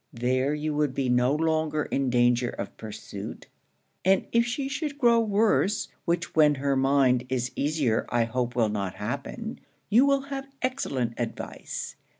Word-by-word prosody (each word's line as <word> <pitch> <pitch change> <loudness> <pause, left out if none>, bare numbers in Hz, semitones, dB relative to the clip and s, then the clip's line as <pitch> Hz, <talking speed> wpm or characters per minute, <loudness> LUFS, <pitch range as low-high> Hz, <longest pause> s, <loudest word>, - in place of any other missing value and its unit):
There 130 +4 0
you 150 0 -2
would 145 -3 0
be 135 -2 0
no 125 +3 +3
longer 155 -1 +1
in 135 -1 -1
danger 120 0 +3
of - - -6
pursuit; 110 -2 -8 0.6
and 190 +1 +3
if 235 0 +3
she 270 +3 -2
should 285 +1 -3
grow 235 -4 +5
worse, 210 -1 +2 0.2
which 170 0 -1
when 150 -2 +5
her 140 0 0
mind 135 -2 +3
is 130 -1 -1
easier 140 -6 0
I 120 -1 +2
hope 120 +1 -2
will 115 -3 +2
not 100 -3 -3
happen, - - -5 0.3
you 245 +6 +6
will 275 -1 +3
have 275 0 -6 0.2
excellent 130 - -1
advice. 120 -2 -5
140 Hz, 155 wpm, -27 LUFS, 125-200 Hz, 0.6 s, you